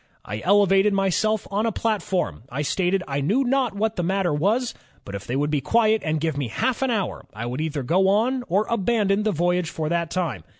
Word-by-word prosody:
'" - - -37
"I 105 +2 -5
elevated 200 +1 +4
myself 195 +2 +1
on 210 +3 0
a - - +1
platform; 190 - -1
I 140 +4 -3
stated 185 +4 0
I 140 0 -2
knew 210 - +2
not 260 -3 +1
what 220 +2 -1
the - - +1
matter 190 -2 0
was, 215 +11 +1 0.3
but 100 - -8
if 100 0 -6
they 125 - -2
would 145 +2 0
be 145 -2 +1
quiet 220 - +2
and 155 0 0
give 155 -2 -1
me 135 - -2
half 250 - -1
an 265 - +1
hour, 210 -6 -2
I 115 +2 -4
would 125 +5 -3
either 155 -3 -2
go 185 +8 +2
on 240 +6 +2
or 195 +5 +1
abandon 210 -2 +1
the 215 0 +1
voyage 175 0 0
for 155 -1 -3
that 170 -1 0
time. 160 - -2
190 Hz, 225 wpm, -23 LUFS, 155-215 Hz, 0.3 s, elevated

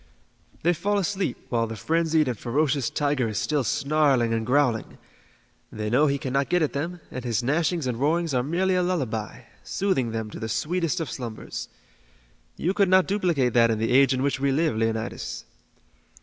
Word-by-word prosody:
They 175 +2 +4
fall 205 +5 0
asleep 195 0 -1
while 115 -2 +1
the 110 - -6
frenzied 160 - +1
and 125 - -1
ferocious 135 +3 0
tiger 145 -4 0
is 110 -2 -4
still 150 +4 0
snarling 140 -2 +2
and 115 0 -2
growling. 125 -4 +1 0.7
They 105 0 -4
know 145 +5 +4
he 140 0 +1
cannot 135 -1 -1
get 180 -2 +2
at 150 - -1
them, 170 +5 -3
and 125 - -6
his 120 -1 -1
gnashings 155 +3 0
and 120 -2 -2
roarings 160 +2 +1
are 125 - +2
merely 175 +8 0
a 180 - +2
lullaby, 130 - -2 0.2
soothing 185 -12 0
them 110 -1 -4
to - - -8
the 110 - -4
sweetest 170 +5 -1
of 160 - -4
slumbers. 115 -4 -6 0.9
You 180 +4 0
could 200 -2 +2
not 185 0 +5
duplicate 170 - +1
that 115 -1 +5
in 110 - +1
the 115 +2 -1
age 135 +2 +5
in 130 0 0
which 140 -1 0
we 140 0 +1
live, 155 -2 +1
Leonidas." 110 0 -3
140 Hz, 185 wpm, -25 LUFS, 120-170 Hz, 0.9 s, not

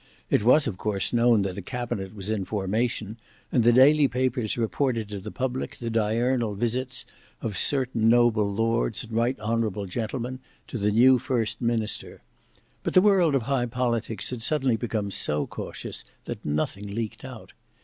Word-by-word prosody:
It - - +4
was 130 +7 +5
of 105 -6 -3
course 105 0 -1
known 120 -3 +4
that 95 0 -3
a - - -5
cabinet 115 -3 -4
was 100 +1 -4
in 105 -3 -1
formation, 105 +2 -2 0.3
and 120 - +3
the 120 - +6
daily 140 +4 +6
papers 125 -3 -1
reported 115 -1 -1
to 100 -1 -5
the 105 +3 -7
public 130 +3 -3
the 115 -1 -4
diurnal 115 +1 +1
visits 125 +4 -2 0.3
of 110 -3 -4
certain 125 -4 +1
noble 115 -3 +4
lords 110 - 0
and 115 - -10
right 120 +3 +1
honourable 110 -2 -1
gentlemen 120 +6 -4 0.3
to 120 - -4
the 105 +1 +2
new 125 +4 +5
first 115 -4 -1
minister. 115 -3 -1 0.6
But - - -3
the 185 - +8
world 185 -8 +4
of 130 - +1
high 130 0 0
politics 115 -3 -1
had 125 -2 -5
suddenly 130 -2 +1
become 110 -3 -2
so 75 -5 0
cautious - - -7 0.2
that - - -6
nothing 80 +7 -2
leaked 115 -2 -4
out. - - -10
115 Hz, 170 wpm, -26 LUFS, 105-125 Hz, 0.6 s, the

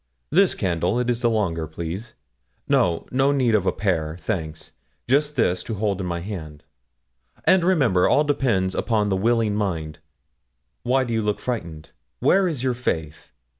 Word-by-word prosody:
This 190 +2 +4
candle, 90 +3 0
it 125 0 +1
is 120 0 -2
the 120 - +3
longer, 85 -8 -1
please; 85 +8 -6 0.5
no 85 -2 +2
no 135 +2 +3
need 130 -5 +2
of 100 -3 +2
a - - +4
pair, 80 -6 -1
thanks; 80 -7 -4 0.4
just 145 +4 +2
this, 90 -8 +1
to 110 - -4
hold 100 -2 -1
in 90 - -3
my 85 -1 -3
hand. 80 -7 -7 0.8
And 185 -2 +5
remember, 135 - +3
all 150 - +4
depends 120 -11 +1
upon 105 -3 0
the 95 - +1
willing 110 +1 +1
mind. 80 -7 -3 0.8
Why 130 +2 +2
do 120 -2 -3
you 110 - +1
look 105 -1 -1
frightened? 85 -11 -5 0.3
Where 190 - +3
is 145 -8 -3
your 130 -1 +1
faith? 80 -11 -4
105 Hz, 170 wpm, -23 LUFS, 85-125 Hz, 0.8 s, And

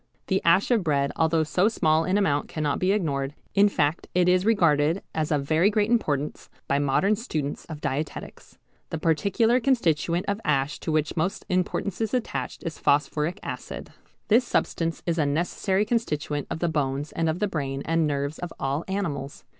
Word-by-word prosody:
The 190 -1 +1
ash 185 +7 +4
of 230 -5 +3
bread 140 -3 +1
although 160 0 +2
so 180 +5 +2
small 160 -7 +2
in 185 +2 +1
amount 145 -8 +1
cannot 150 -2 -2
be 185 +1 +2
ignored, 145 -8 -1 0.2
in 205 +1 +5
fact 155 -3 0
it 180 0 +4
is 185 +2 +3
regarded 165 -5 +3
as 155 -1 -1
of 145 -2 +1
very 160 +7 +3
great 210 +1 +1
importance 150 - -1 0.2
by 140 - +2
modern 145 +9 +2
students 155 - -4
of 155 -3 -8
dietetics. 145 +3 -5 0.3
The - - -3
particular 200 +9 +2
constituent 175 - +1
of 200 - 0
the 220 - -11
ash 140 -1 +1
to 160 - -3
which 155 -1 0
most 175 +3 -1
importance 185 +3 -1
is 220 +2 0
attached 245 - -3
is 165 -3 -5
phosphoric 150 +3 +1
acid. - - -6 0.4
This 230 +4 +5
substance 165 -8 -1
is 170 -1 0
a 150 - +3
necessary 180 +6 0
constituent 150 - -1
of - - -3
the 175 - 0
bones 145 -2 -1
and 165 -1 0
of 160 - -1
the 210 +2 0
brain 140 -6 -3
and 165 -1 +2
nerves 140 +1 -2
of 175 -1 -5
all 140 +4 -1
animals. 155 -8 -3
165 Hz, 185 wpm, -25 LUFS, 145-195 Hz, 0.4 s, in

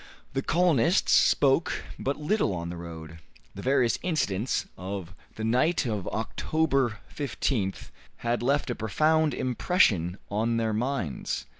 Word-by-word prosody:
The 135 - 0
colonists 170 -1 +3
spoke 140 +4 +3 0.2
but 140 +2 -1
little 150 - +1
on 85 0 -4
the - - -6
road. 85 -1 -9 0.3
The 100 - -8
various 130 -2 +2
incidents 135 - 0
of 95 -1 -6 0.2
the 110 - -5
night 130 +9 +2
of 105 -6 -2
October 135 +1 0 0.2
15th 125 -8 -2 0.3
had 120 0 +1
left 140 +1 +1
a - - 0
profound 155 +7 +2
impression 110 - +2
on 115 +3 +1
their 110 -1 0
minds. 120 - -2
120 Hz, 130 wpm, -27 LUFS, 100-145 Hz, 0.3 s, colonists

